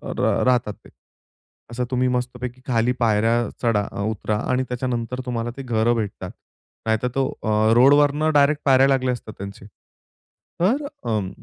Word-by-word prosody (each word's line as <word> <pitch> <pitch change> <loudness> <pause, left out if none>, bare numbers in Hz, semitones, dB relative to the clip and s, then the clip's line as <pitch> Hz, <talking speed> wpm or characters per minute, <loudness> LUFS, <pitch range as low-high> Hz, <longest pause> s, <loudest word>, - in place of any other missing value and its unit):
र - - +1
राहतात 125 -4 +2
ते. - - -14 0.8
असं 125 +1 -2
तुम्ही 130 0 +1
मस्तपैकी 125 0 -3
खाली 120 0 +2
पायऱ्या 115 +1 +2 0.2
चढा-उतरा 105 -1 -1
आणि 130 +1 +1
त्याच्यानंतर 125 0 -3
तुम्हाला 120 -1 -3
ते 135 - -6
घरं 120 -1 +1
भेटतात. 105 -4 -4 0.5
नाहीतर 110 +2 +1
तो 135 - +2 0.2
अ, - - -3 0.3
रोडवरनं 145 +4 +4
डायरेक्ट 145 +1 +3
पायऱ्या 135 -1 +5
लागल्या 130 -2 +1
असतात 110 -3 -8
त्यांचे. 100 0 -9 1.0
तर 265 +11 +2 0.2
अं 105 -4 -1
125 Hz, 135 wpm, -22 LUFS, 115-130 Hz, 1.0 s, पायऱ्या